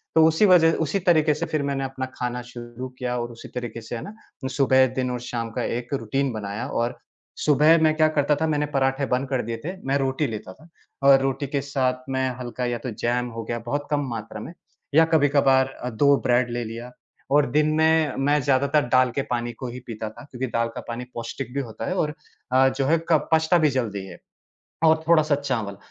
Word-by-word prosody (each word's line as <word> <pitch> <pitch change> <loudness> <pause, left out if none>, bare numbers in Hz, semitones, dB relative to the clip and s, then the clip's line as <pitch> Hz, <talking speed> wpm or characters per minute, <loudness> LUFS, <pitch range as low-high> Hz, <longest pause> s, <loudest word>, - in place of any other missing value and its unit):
तो 160 - +7
उसी 160 +6 +3
वज़ह 170 -4 +6
उसी 180 +6 -1
तरीके 160 -4 +3
से 150 - -3
फिर 155 - 0
मैंने 140 -1 -1
अपना 135 0 -4
खाना 125 0 -3
शुरू 120 +1 -8
किया 125 -1 -2
और 120 0 -4
उसी 115 - -11
तरीके 120 -2 -5
से, 115 - -6
है 115 - -5
ना? 205 - -8 0.3
सुबह, 130 -1 +4
दिन 125 -1 -1
और 125 - -3
शाम 115 -1 -4
का - - -3
एक 120 +3 -3
रूटीन 135 +2 -1
बनाया 105 +2 -4
और 120 -3 -2 0.5
सुबह 150 +2 +5
मैं 155 -1 +4
क्या 155 -1 +5
करता 145 +1 +3
था, 160 - +2
मैंने 150 -1 +1
पराठे 135 0 +1
बंद 130 +2 0
कर 130 -2 0
दिए 115 0 -3
थे। 180 +4 -4
मैं 135 - +2
रोटी 135 +2 0
लेता 105 -4 -6
था 160 - -19 0.4
और 135 -1 +8
रोटी 135 +1 -1
के 140 +1 -1
साथ 130 -2 -1
मैं 130 0 0
हल्का 125 0 -4
या 120 -1 -1
तो 125 - -5
जैम 125 +1 +1
हो 115 - -3
गया 120 +1 -3
बहुत 145 +4 -2
कम 145 - +2
मात्रा 110 -2 -6
में 165 - -8 0.4
या 160 +1 +7
कभी-कबार 135 -3 +3 0.2
2 140 +2 +5
ब्रेड 120 0 +2
ले 120 0 -2
लिया 115 +2 -7 0.4
और 145 0 +5
दिन 150 +2 +3
में 160 -2 +3
मैं 145 +1 +3
ज़्यादातर 140 +2 +2
दाल 130 0 +4
के 135 - -1
पानी 120 0 -1
को 125 +3 -7
ही 125 +1 -7
पीता 110 -1 -5
था, 110 - -13
क्योंकि 130 +1 -3
दाल 115 -1 0
का - - -5
पानी 120 +1 -5
पौष्टिक 120 +2 -6
भी 140 - -1
होता 110 -5 -7
है 185 - -2
और 150 -5 0 0.4
अ, 130 +1 +5
जो 135 +1 -2
है 160 +5 +3
कप 160 -3 +2
पचता 160 +2 +4
भी 155 -3 +3
जल्दी 110 -7 -2
है 85 - -11 0.7
और 160 0 +4
थोड़ा-सा 155 -3 +4
चावल। 115 -8 -3
130 Hz, 220 wpm, -24 LUFS, 120-145 Hz, 0.7 s, और